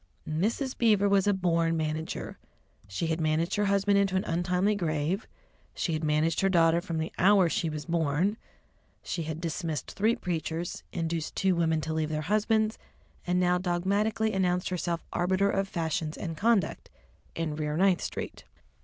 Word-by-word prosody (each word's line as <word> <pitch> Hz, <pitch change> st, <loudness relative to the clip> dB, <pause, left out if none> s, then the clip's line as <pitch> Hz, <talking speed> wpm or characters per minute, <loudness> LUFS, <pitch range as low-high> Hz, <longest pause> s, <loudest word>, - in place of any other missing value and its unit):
Mrs. 220 Hz, -, -1 dB
Beaver 210 Hz, -4 st, +3 dB
was 200 Hz, 0 st, +3 dB
a 205 Hz, -, +4 dB
born 165 Hz, -3 st, +1 dB
manager; 155 Hz, 0 st, -3 dB, 0.5 s
she 100 Hz, -, -3 dB
had 160 Hz, 0 st, -1 dB
managed 155 Hz, +2 st, +1 dB
her 205 Hz, -, +1 dB
husband 200 Hz, 0 st, +3 dB
into 195 Hz, -1 st, +1 dB
an 185 Hz, -, +1 dB
untimely 180 Hz, +4 st, +1 dB
grave, 170 Hz, +1 st, -1 dB, 0.5 s
she 170 Hz, -, -1 dB
had 155 Hz, 0 st, -2 dB
managed 155 Hz, +1 st, +1 dB
her 195 Hz, -, +3 dB
daughter 170 Hz, -2 st, +4 dB
from 170 Hz, -3 st, -4 dB
the 160 Hz, +1 st, -2 dB
hour 195 Hz, -1 st, +5 dB
she 165 Hz, 0 st, -1 dB
was 150 Hz, -1 st, -5 dB
born, 170 Hz, +4 st, +1 dB, 0.7 s
she 170 Hz, -, -3 dB
had 160 Hz, 0 st, -4 dB
dismissed 165 Hz, -3 st, -3 dB
three 220 Hz, +4 st, +2 dB
preachers, 170 Hz, 0 st, -3 dB
induced 165 Hz, -2 st, -3 dB
two 190 Hz, -1 st, +2 dB
women 160 Hz, -2 st, +1 dB
to 160 Hz, +1 st, -3 dB
leave 155 Hz, -1 st, -1 dB
their 155 Hz, 0 st, -2 dB
husbands, 220 Hz, 0 st, +2 dB, 0.5 s
and 180 Hz, +1 st, +2 dB
now 180 Hz, 0 st, +3 dB
dogmatically 200 Hz, +5 st, 0 dB
announced 180 Hz, -2 st, +1 dB
herself 175 Hz, -2 st, -2 dB
arbiter 190 Hz, +3 st, +2 dB
of 195 Hz, 0 st, 0 dB
fashions 160 Hz, -3 st, -2 dB
and 165 Hz, -3 st, -4 dB
conduct 205 Hz, -1 st, +1 dB, 0.5 s
in 160 Hz, -2 st, -2 dB
Rear 150 Hz, 0 st, -2 dB
Ninth 185 Hz, -1 st, +3 dB
Street. -, -, -5 dB
175 Hz, 165 wpm, -28 LUFS, 160-195 Hz, 0.7 s, hour